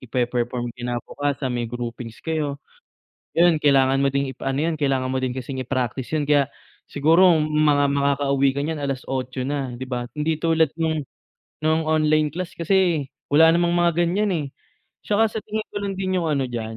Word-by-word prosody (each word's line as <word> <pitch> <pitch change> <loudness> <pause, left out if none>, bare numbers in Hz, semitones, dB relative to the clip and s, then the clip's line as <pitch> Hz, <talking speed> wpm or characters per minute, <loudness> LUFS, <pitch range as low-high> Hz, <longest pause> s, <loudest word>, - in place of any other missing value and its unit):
ipe-perform 120 -1 -2
kinabukasan, 125 +3 -3
may 120 -2 -2
groupings 120 -1 -7
kayo, 155 -3 -1 0.8
'yun 170 -1 +4
kailangan 135 -2 +3
mo 140 - +2
din 140 0 0
ipa 135 +1 -4
ano 145 - 0
'yun, 160 - -4
kailangan 135 -3 0
mo 130 - 0
din 130 -1 -2
kasing 130 +1 -5
i-practice 130 +1 -2
'yun 150 -1 -1
kaya 145 -2 +4 0.5
siguro 165 +6 +5
mga 150 -2 +3
makakauwi 140 -1 +2
ka - - 0
niyan 155 -1 -3
8:00 130 -1 -3
na 140 -2 -2
'di 130 +1 -6
ba? 120 -1 -4
Hindi 155 +1 0
tulad 160 -2 +2
nung 160 -1 +1 0.6
nung 160 +1 +2
online 155 -1 +3
class 180 0 -4
kasi 170 -4 +2 0.3
wala 160 +2 +7
namang 170 0 +2
mga 175 -1 +2
ganiyan, 200 +4 0
eh, 150 - -3 0.6
'tsaka 210 +1 +2
sa 220 - -4
tingin 215 0 -4
ko - - -11
lang 200 -1 -2
din 185 -1 -1
'yung 165 - -1
ano 140 -3 +1
diyan 115 -2 -5
145 Hz, 175 wpm, -23 LUFS, 130-160 Hz, 0.8 s, wala